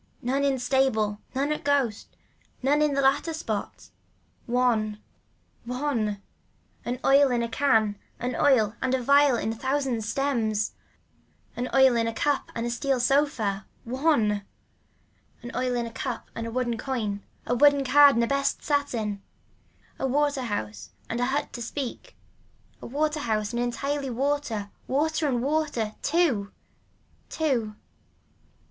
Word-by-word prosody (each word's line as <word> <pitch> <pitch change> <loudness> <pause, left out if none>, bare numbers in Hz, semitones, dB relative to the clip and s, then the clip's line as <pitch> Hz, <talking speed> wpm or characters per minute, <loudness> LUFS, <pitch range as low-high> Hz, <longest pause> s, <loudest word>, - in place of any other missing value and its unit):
None 270 +3 0
in 275 -1 +2
stable, 245 -5 +1 0.2
none 280 +3 0
at 300 - -2
ghosts, 275 -7 +1 0.6
none 290 +3 +3
in 300 -2 +2
the 275 - +2
latter 280 +5 +2
spot. 220 -10 -5 0.6
ONE. 230 -4 +1 0.6
One. 235 -5 -2 0.6
An 245 +1 -3
oil 275 0 +6
in 240 -1 +1
a - - -1
can, 225 -5 +2 0.2
an 250 +1 -3
oil 230 -7 +3
and 260 0 +1
a 255 - -2
vial 280 +1 +5
with 225 -1 -1
a - - -8
thousand 260 -1 -1
stems. 220 -3 0 0.8
An 245 +1 -3
oil 265 -2 +5
in 230 -1 +1
a 230 - -2
cup 290 +5 0
and 230 - -2
a 240 - -1
steel 260 +2 0
sofa. 245 -7 +1 0.2
One. 235 -6 +1 1.0
An 240 - -6
oil 250 0 0
in 240 -1 -1
a 230 - -7
cup 240 0 -5
and 230 0 -4
a - - -5
woolen 240 -2 -1
coin, 220 -7 -2 0.2
a 245 - 0
woolen 285 +2 +5
card 285 +1 +7
and 235 - +2
a - - +1
best 275 +1 0
satin. 235 -9 -1 0.8
A 270 - 0
water 285 +1 +1
house 110 - -4 0.2
and 230 - -2
a 245 - +2
hut 275 +3 -2
to 240 - -6
speak, 250 +2 -5 0.7
a - - -7
water 300 +4 0
house 215 -4 -1
and 240 - -1
entirely 275 +3 -2
water, 250 -5 -2 0.2
water 310 +3 +1
and 245 -3 0
water. 285 -7 -1
TWO. 285 - +1 0.8
Two. 245 -9 -1
250 Hz, 150 wpm, -26 LUFS, 225-280 Hz, 1.0 s, card